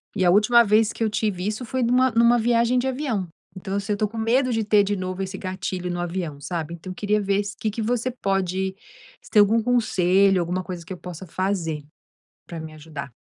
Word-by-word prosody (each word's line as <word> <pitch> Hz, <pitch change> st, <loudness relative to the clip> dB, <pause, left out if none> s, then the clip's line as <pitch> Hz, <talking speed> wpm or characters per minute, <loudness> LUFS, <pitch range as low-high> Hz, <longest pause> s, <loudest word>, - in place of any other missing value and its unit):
e 185 Hz, -, +1 dB
a 175 Hz, -, +5 dB
última 215 Hz, +5 st, +6 dB
vez 215 Hz, +1 st, +3 dB
que -, -, -12 dB
eu 220 Hz, -, +2 dB
tive 205 Hz, -3 st, -1 dB
isso 215 Hz, +4 st, -3 dB
foi 260 Hz, +3 st, -2 dB
numa 250 Hz, +2 st, +3 dB
numa 235 Hz, +1 st, +5 dB
viagem 235 Hz, +1 st, +2 dB
de 250 Hz, -, -2 dB
avião. 255 Hz, -8 st, -2 dB, 0.3 s
Então, 190 Hz, +1 st, -5 dB
assim, 200 Hz, +1 st, -2 dB
eu -, -, 0 dB
estou 210 Hz, 0 st, -1 dB
com 225 Hz, -, -9 dB
medo 250 Hz, +4 st, +2 dB
de 225 Hz, -1 st, 0 dB
ter 210 Hz, -1 st, +4 dB
de 205 Hz, +1 st, -1 dB
novo 185 Hz, +1 st, -3 dB
esse 190 Hz, 0 st, -5 dB
gatilho 185 Hz, -1 st, -4 dB
no 175 Hz, -, -3 dB
avião, 170 Hz, -4 st, -4 dB
sabe. 165 Hz, 0 st, -4 dB
Então 175 Hz, +2 st, -9 dB
eu -, -, -8 dB
queria 210 Hz, +1 st, 0 dB
ver 200 Hz, 0 st, +1 dB
se 200 Hz, 0 st, -6 dB
o -, -, -55 dB
que 215 Hz, -, 0 dB
que 225 Hz, -, -4 dB
você 240 Hz, +3 st, 0 dB
pode, 190 Hz, -4 st, -1 dB, 0.5 s
se -, -, -17 dB
tem 215 Hz, -, +5 dB
algum 220 Hz, +3 st, +4 dB
conselho, 195 Hz, -5 st, +3 dB
alguma 175 Hz, +2 st, -2 dB
coisa 175 Hz, -2 st, -7 dB
que -, -, -13 dB
eu -, -, -8 dB
possa 180 Hz, +1 st, -8 dB
fazer, 170 Hz, -4 st, -2 dB, 0.6 s
para 170 Hz, -, -7 dB
me 160 Hz, 0 st, -8 dB
ajudar. 150 Hz, -3 st, -8 dB
200 Hz, 235 wpm, -23 LUFS, 180-225 Hz, 0.6 s, última